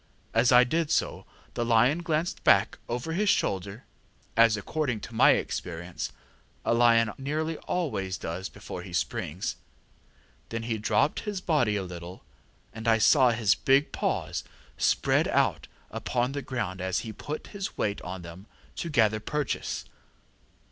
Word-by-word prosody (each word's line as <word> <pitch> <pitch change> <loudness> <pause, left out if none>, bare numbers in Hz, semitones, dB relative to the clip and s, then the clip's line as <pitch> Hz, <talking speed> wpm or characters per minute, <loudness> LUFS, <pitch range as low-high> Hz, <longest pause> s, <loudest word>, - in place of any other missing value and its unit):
As 115 +2 +4
I 125 0 +8
did 160 +5 0
so, - - 0 0.3
the 120 - -1
lion 120 +7 +4
glanced 165 0 -1
back - - +4
over 125 +7 -3
his 205 +4 +1
shoulder, 100 - 0 0.5
as, 115 -2 +5
according 120 +2 -2
to 115 - -9
my 115 - +6
experience, 85 0 -4 0.5
a - - +3
lion 115 -2 +4
nearly 155 +4 -2
always 100 - -2
does 90 +4 -5
before - - -8
he - - -10
springs. 90 +6 -2 0.9
Then 115 0 -4
he 115 -1 -2
dropped 105 +7 +2
his 205 -3 -4
body 150 - +1
a 100 - -1
little, 90 0 -8 0.5
and 110 0 -6
I 115 -1 +5
saw 130 +3 +5
his 110 -3 +3
big 135 +2 +2
paws - - -2 0.3
spread - - +2
out - - +1 0.2
upon 125 +1 -1
the 140 0 -3
ground 95 -9 -4
as 95 -1 0
he 110 - -7
put 150 +6 -6
his 195 -1 -5
weight 100 -1 -1
on 90 0 -6
them 85 +5 -11 0.3
to 170 - -3
gather 110 -7 +3
purchase. 150 +5 -3
115 Hz, 150 wpm, -28 LUFS, 100-145 Hz, 0.9 s, I